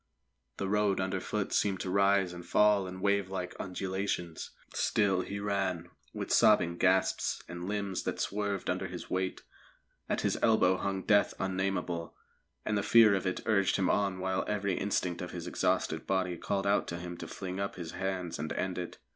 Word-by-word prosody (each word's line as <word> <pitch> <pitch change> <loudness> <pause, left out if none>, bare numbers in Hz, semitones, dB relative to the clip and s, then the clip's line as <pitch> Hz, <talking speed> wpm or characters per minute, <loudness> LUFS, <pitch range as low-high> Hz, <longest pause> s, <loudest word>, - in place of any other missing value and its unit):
The 100 - -2
road 105 -1 +2
underfoot 95 +2 -2
seemed 95 -3 +1
to 90 - -3
rise 100 -2 +3
and 85 0 -8
fall 105 0 +3
in 95 0 -7
wavelike 95 -2 0
undulations. 95 -2 -3 0.2
Still 100 -4 +2
he 100 +2 -5
ran, 95 -4 -1 0.2
with - - -5
sobbing 85 -5 +5
gasps 95 0 +2
and 85 +1 -6
limbs 100 -2 -2
that - - -2
swerved 100 -1 -2
under - - -1
his - - -8
weight; 95 0 -2 0.7
at - - 0
his - - 0
elbow 95 -5 +4
hung 95 -1 -2
death 100 -1 +3
unnamable, 95 -3 -2 0.5
and 110 - 0
the 100 - +2
fear 110 -1 +6
of 95 -1 0
it 90 - -2
urged 100 -3 +3
him 95 -2 +2
on 100 -2 +1
while 95 0 -1
every 100 -2 0
instinct 90 -3 -1
of - - -5
his - - -5
exhausted - - 0
body 95 -2 0
called 100 +3 -2
out 100 +1 +2
to 85 - -4
him 85 0 -6
to - - -7
fling 95 -1 -5
up 100 0 -2
his 85 -3 -6
hands 95 -4 -3
and 80 +1 -3
end 95 -1 -2
it. 90 - -6
95 Hz, 180 wpm, -31 LUFS, 90-100 Hz, 0.7 s, fear